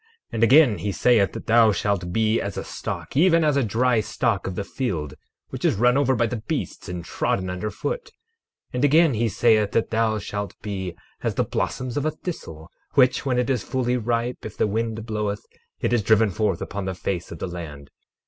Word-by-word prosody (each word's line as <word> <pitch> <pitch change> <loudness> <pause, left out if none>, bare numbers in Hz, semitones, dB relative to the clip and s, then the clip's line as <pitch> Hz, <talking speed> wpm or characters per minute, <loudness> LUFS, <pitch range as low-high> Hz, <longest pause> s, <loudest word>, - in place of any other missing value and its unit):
12:11 450 - -35 0.3
And 115 - +1
again, 130 -2 +6
he 105 - -2
saith 105 +1 +3
that - - -7
thou 115 -1 +5
shalt 95 -2 -1
be 110 +3 +2
as 100 -2 -4
a - - -3
stalk, - - -6
even 165 +2 +5
as 150 -2 +3
a 140 - +2
dry 120 +2 +2
stalk 105 - -1
of 95 - -4
the 100 - -2
field, 95 - -3 0.4
which - - -7
is - - +3
run 120 +4 +3
over 135 -2 +3
by 120 - +2
the 115 -1 -3
beasts - - -3
and 90 -2 -5
trodden 95 +3 -1
under 90 +4 -3
foot. 485 - -4
12:12 - - -17 0.6
And 125 +2 -1
again, 155 +1 +5
he 115 +1 +1
saith 110 0 +3 0.2
thou 110 -1 +1
shalt 105 0 -5
be 95 -4 -4 0.3
as - - -1
the - - +2
blossoms 125 -1 -3
of 145 - -1
a - - +3
thistle, 85 - -7 0.2
which, 130 0 +4
when 125 -2 +1
it 125 +2 +1
is 125 -5 0
fully 125 +1 -1
ripe, 120 +1 -1
if 110 - -8
the - - +2
wind 110 +1 -2
bloweth, 105 -2 -3 0.4
it - - +1
is 120 - +3
driven 110 0 +3
forth 100 -2 0
upon 100 -1 -5
the 95 -1 -3
face 90 -1 -3
of 85 - -6
the - - -4
land. 75 -5 -8
110 Hz, 215 wpm, -24 LUFS, 100-125 Hz, 0.6 s, again